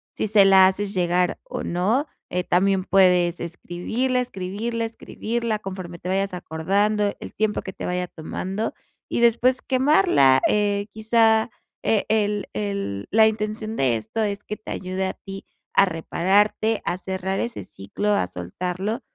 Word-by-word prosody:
si - - -1
se 205 -1 +6
la 190 -1 +7
haces 195 +1 -1
llegar, 180 -1 +1
o - - -6
no. 205 - +1 0.3
Eh, 180 0 0
también 190 +1 +2
puedes 180 -3 +3
escribirla, 180 +9 -2
escribirla, 230 +1 -3
escribirla 230 0 -3
conforme 185 -3 -7
te 180 - -6
vayas 195 0 0
acordando, 200 +5 0
el - - -9
tiempo 215 0 0
que 190 - -7
te - - -6
vaya 180 0 -1
tomando, 190 +6 -4 0.3
y - - -1
después 240 +2 +3
quemarla. 195 - +4
Eh, 205 -1 +1
quizá, 220 +1 +3 0.3
e 215 -3 +1
el 210 -2 +1
el 200 - -3
la 220 +1 +6
intención 215 0 -3
de 130 -3 +2
esto 110 - -3
es 205 -1 -2
que 210 - -6
te - - -9
ayude 185 +1 -3
a - - -3
ti 195 0 -10 0.3
a 195 - +6
repararte, 200 +5 +1
a 175 - -2
cerrar 190 +1 -3
ese 235 0 -3
ciclo, 200 - -3
a 90 - +1
soltarlo, 180 - -4
195 Hz, 155 wpm, -23 LUFS, 180-220 Hz, 0.3 s, la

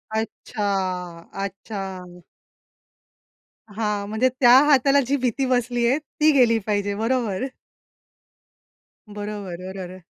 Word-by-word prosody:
अच्छा, 220 0 -4 0.8
अच्छा. 190 -3 -7 1.5
हां. 210 -2 -1
म्हणजे 220 +4 +2
त्या 245 -2 +7
हाताला 280 -1 +5
जी 280 - +2
भीती 255 +2 +1
बसलीये 245 0 +1
ती 310 0 +1
गेली 245 -5 +4
पाहिजे 205 -1 0
बरोबर. 225 -1 -1 1.6
बरोबर, 205 -3 -6
बरोबर. 185 -1 -8
220 Hz, 90 wpm, -23 LUFS, 200-250 Hz, 1.6 s, त्या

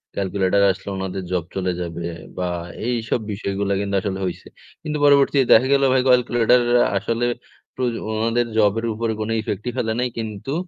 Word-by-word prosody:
Calculator 100 0 +1
আসলে 95 - -7
ওনাদের 95 0 -4
job 90 -2 0
চলে 95 -1 0
যাবে 85 0 -5 0.3
বা 90 -1 -1 0.4
এইসব 120 -1 -1
বিষয়গুলা 100 -1 -2
কিন্তু 100 0 -2
আসলে 95 -1 -3
হইছে। 90 - -5 0.4
কিন্তু 150 -1 -2
পরবর্তীতে 140 -1 +4
দেখা 125 +4 +5
গেল 140 0 +3
ভাই 130 - +4
ক্যালকুলেটর 125 -1 +4 0.2
আ - - +4
আসলে 115 +4 -1 0.5
প্র - - -6 0.3
ওনাদের 115 +2 +1
জবের 110 +2 +2
উপরে 115 +1 -2
কোনো 110 +1 -2
effect 105 -1 -4
ই - - -3
ফেলে 110 -3 0
নাই। 125 - +1
কিন্তু 110 +4 -4
110 Hz, 170 wpm, -21 LUFS, 95-120 Hz, 0.5 s, দেখা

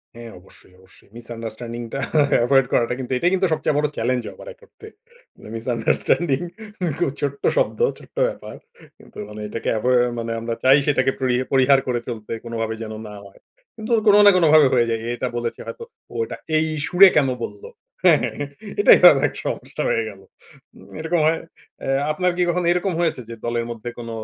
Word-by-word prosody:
হ্যাঁ, 115 0 -10
অবশ্যই, 90 0 -18
অবশ্যই। 95 0 -20
মিসআন্ডারস্ট্যান্ডিং 115 0 -7
টা 135 - -2 0.5
এভয়েড 135 +1 +4
করাটা 120 +1 +2
কিন্তু 130 0 -6
এটাই 175 +7 +1
কিন্তু 190 0 +2
সবচেয়ে 155 - -1
বড় 150 0 +2
চ্যালেঞ্জ, 125 +1 0
আবার - - -13
এক - - -33
অর্থে। 435 - -15 0.7
মিসআন্ডারস্ট্যান্ডিং 125 +5 0 0.6
খুব 175 - +1
ছোট্ট 140 -1 -3 0.2
শব্দ, - - 0 0.2
ছোট্ট - - -18
ব্যাপার। - - -9 0.4
কিন্তু - - -17
মানে 105 0 -9
এটাকে 115 - -4
এভোই 125 +4 +1 0.2
মানে 115 0 -4
আমরা 115 +1 -4
চাই 130 +2 +6
সেটাকে 135 -2 +2
পরি 130 -2 +1 0.2
পরিহার 135 0 +4
করে 120 -1 0
চলতে 115 -4 -7
কোনো 115 0 -6
ভাবে 110 0 -2
যেন 110 0 -7
না 105 - -10
হয়। 100 - -17 0.4
কিন্তু 220 +2 -6 0.2
কোনো 205 0 +7
না 205 - +9
কোনোভাবে 155 -4 +6
হয়ে 120 -2 +3
যায়। 115 -1 -1
এ, - - -5
এটা 125 - -3
বলেছে 120 -1 -4
হয়তো, 465 - -7 0.3
ও - - -12
এটা - - -8 0.2
এই 155 - +2 0.2
সুরে 185 +3 +7
কেন 145 -3 +4 0.2
বলল? 105 -1 -7 0.4
হ্যাঁ, - - +6
হ্যাঁ, - - -3
হ্যাঁ 145 -1 -4 0.3
এটাই 410 - +7 0.2
অনেক - - 0
সমস্যা - - -4
হয়ে - - +1
গেল। - - -13 0.6
উম - - -16
এরকম 160 +2 0
হয় 160 +1 +1 0.5
এ - - -5 0.2
আপনার 180 +3 0
কি - - 0
কখনও 175 0 0
এরকম 180 +1 -1
হয়েছে? 165 -7 0
যে 115 - -6
দলের 120 0 -1
মধ্যে 115 +1 -6
কোন 115 - -7
130 Hz, 190 wpm, -21 LUFS, 115-160 Hz, 0.7 s, না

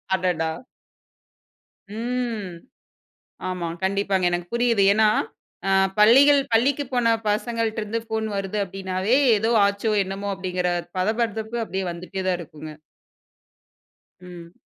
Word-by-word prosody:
அடடா! 175 -4 -1 1.4
ம். 225 -4 -3 0.9
ஆமா, 180 -2 -3 0.2
கண்டிப்பாங்க. 195 -1 0
எனக்கு 175 0 -2
புரியுது. 235 -4 +2
ஏன்னா, 215 0 +4 0.6
ஆ - - +2 0.3
பள்ளிகள் 275 +7 +7
பள்ளிக்கு 275 +5 +2
போன 245 -2 +2 0.2
பசங்கள்ட்ட 225 +1 -1
இருந்து 220 +2 -3
போன் 220 0 -1
வருது 195 +1 -3
அப்படினாவே, 190 +4 -1 0.2
ஏதோ 220 +2 0 0.2
ஆச்சோ! 200 +2 -1
என்னமோ! 195 +1 -5
அப்படிங்கிற 185 -1 -2 0.3
பதபதப்பு 220 +3 -1
அப்படியே 190 -3 -3
வந்துட்டே 180 +2 -6
தான் 180 -1 +1
இருக்குங்க. 155 -1 -9 1.5
ம். 175 -2 -11
200 Hz, 105 wpm, -23 LUFS, 185-225 Hz, 1.5 s, பள்ளிகள்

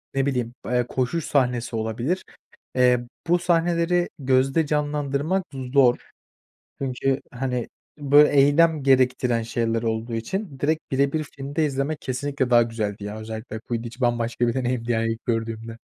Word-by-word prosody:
ne 135 0 +2
bileyim, 125 -4 -1
eee, 125 0 +1
koşuş 135 +5 -1
sahnesi 125 -3 0
olabilir. 115 +11 -2 0.5
Eee, 125 -1 +3 0.2
bu 175 +1 +3
sahneleri 175 0 +1
gözde 135 +3 +2
canlandırmak 150 +4 0 0.3
zor. 130 -3 +3 0.7
Çünkü 135 +1 -1
hani, 125 -1 -2 0.3
böyle, 145 +1 +6
eylem 145 +2 +4
gerektiren 130 -3 +3
şeyler 115 0 -1
olduğu 115 +1 -2
için 140 - -4
direkt 155 +3 -1
bire 140 +1 +2
bir 155 -1 0
filmde 140 +2 -3
izlemek 140 +2 -2
kesinlikle 135 0 -2
daha 120 -1 +6
güzeldi. 110 -3 -4
Yani, 105 +1 -5
özellikle 110 0 -6
Quidditch 120 +2 -5
bambaşka 120 0 +1
bir 120 - +1
deneyimdi, 125 -2 -1
yani, 115 0 +1
ilk 115 - -13
gördüğümde. 115 -1 -3
130 Hz, 140 wpm, -24 LUFS, 115-145 Hz, 0.7 s, böyle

